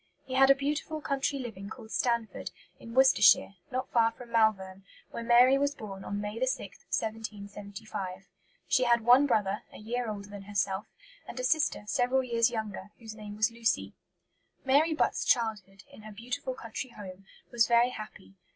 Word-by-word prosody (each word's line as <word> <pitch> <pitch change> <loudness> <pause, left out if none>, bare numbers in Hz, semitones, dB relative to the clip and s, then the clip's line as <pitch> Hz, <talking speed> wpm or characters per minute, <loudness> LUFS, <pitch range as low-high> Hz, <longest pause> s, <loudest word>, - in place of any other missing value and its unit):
He 260 - -7
had 270 +1 +5
a 275 - +8
beautiful 295 +3 -2
country 280 -1 -1
living 210 -6 -7
called 220 -1 -10
Stanford, 235 -2 -1 0.3
in 230 +1 -10
Worcestershire, 260 -7 +6 0.2
not 255 0 -4
far 230 -1 +4
from 240 0 -13
Malvern, 195 -4 +1 0.3
where - - -5
Mary 245 +3 +5
was 285 +1 0
born 195 -3 -8
on 205 - -4
May 210 +4 -3
6, 260 - +1 0.3
1775. 205 -3 -5 0.4
She 255 - +3
had 235 -1 +4
one 250 +5 +6
brother, 205 -4 +1
a - - -12
year 235 +2 -3
older 200 -1 -6
than 200 -1 -9
herself, 200 0 -1 0.4
and - - -7
a - - -3
sister 295 -3 +1
several 250 +4 +1
years 235 -1 +2
younger, 215 -4 -5
whose 225 -2 -9
name 210 -1 -9
was 215 +2 +2
Lucy. 230 0 -1 0.7
Mary 300 +4 +3
Butt's - - +1
childhood, 210 -5 0
in - - -13
her 215 0 -10
beautiful 245 +4 -5
country 230 +3 -6
home, 195 -4 -11 0.2
was 235 -2 +3
very 235 +1 +4
happy. 215 -4 -10
230 Hz, 170 wpm, -29 LUFS, 205-255 Hz, 0.7 s, a